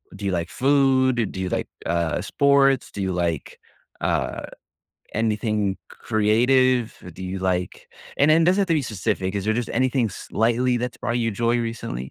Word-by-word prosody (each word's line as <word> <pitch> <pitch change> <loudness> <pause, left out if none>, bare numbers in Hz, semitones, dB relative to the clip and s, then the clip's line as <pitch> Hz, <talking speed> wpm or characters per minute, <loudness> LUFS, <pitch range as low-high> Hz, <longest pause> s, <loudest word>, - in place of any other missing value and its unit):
do 100 - -7
you 95 - 0
like 85 -1 -2
food? 130 -4 +2
Do 95 - -7
you 95 - -2
like, - - -2 0.2
uh, 85 0 0
sports? 135 +5 +3
Do 100 - -5
you 95 -1 -1
like, 85 -4 -2 0.4
uh, - - -1 0.7
anything 105 -2 0 0.2
c - - -14
creative? 120 +3 +2 0.2
Do 95 - -9
you 95 +1 -4
like 90 -1 -2 0.3
and 145 - +4
then 165 +1 +5
it - - +3
doesn't 185 +3 +3
have 195 - 0
to 165 - +2
be 150 - +2
specific. 100 -3 -2
Is 100 0 -2
there 110 - +2
just 120 0 -2
anything 130 0 +1
slightly 120 +5 0
that's 125 0 -4
brought 120 0 -2
you 115 -1 0
joy 115 +3 +1
recently? 115 - -4
115 Hz, 185 wpm, -23 LUFS, 95-130 Hz, 0.7 s, then